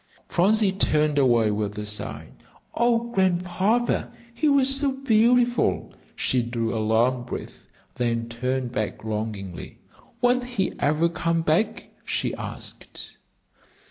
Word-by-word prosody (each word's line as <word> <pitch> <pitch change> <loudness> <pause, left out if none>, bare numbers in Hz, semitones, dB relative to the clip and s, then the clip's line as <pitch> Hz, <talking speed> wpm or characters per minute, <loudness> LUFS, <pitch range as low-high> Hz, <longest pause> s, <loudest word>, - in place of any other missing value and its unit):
Phronsie 200 +3 +3
turned 155 -6 +2
away 120 -5 +4
with 105 0 -2
a 105 - -4
sigh. 105 0 -3 0.4
"Oh, 235 0 +1
Grandpapa, 190 +4 +1 0.2
he 295 +6 +1
was 275 -1 +4
so 275 -1 +1
beautiful!" 245 -1 +2 0.2
She 125 - +1
drew 115 -1 -2
a 110 - 0
long 120 +4 +2
breath, 120 - -8 0.3
then 115 -1 -1
turned 125 +1 -2
back 110 -4 -3
longingly. 105 -5 -5 0.4
"Won't 245 +1 +3
he 230 -7 -2
ever 155 +3 +2
come 165 -1 -1
back?" 205 +8 0
she - - -2
asked. - - -7
155 Hz, 120 wpm, -24 LUFS, -, 0.4 s, away